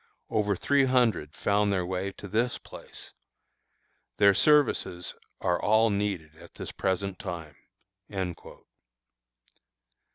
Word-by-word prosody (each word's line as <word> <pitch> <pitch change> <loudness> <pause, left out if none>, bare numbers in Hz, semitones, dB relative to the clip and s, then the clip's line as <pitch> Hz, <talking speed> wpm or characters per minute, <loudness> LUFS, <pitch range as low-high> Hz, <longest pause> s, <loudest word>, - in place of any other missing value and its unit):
Over 105 -2 +1
three 140 +8 +3
hundred 115 - +1
found 100 0 +1
their 90 -2 0
way 95 +2 -2
to 100 - -10
this 115 +5 0
place. - - -12 1.0
Their 100 -1 +6
services 100 - +2 0.3
are 90 -1 +1
all 110 +1 +4
needed 100 -7 -2
at - - -15
this - - -6
present 95 0 -2
time." 85 -6 -6
100 Hz, 105 wpm, -28 LUFS, 90-110 Hz, 1.0 s, Their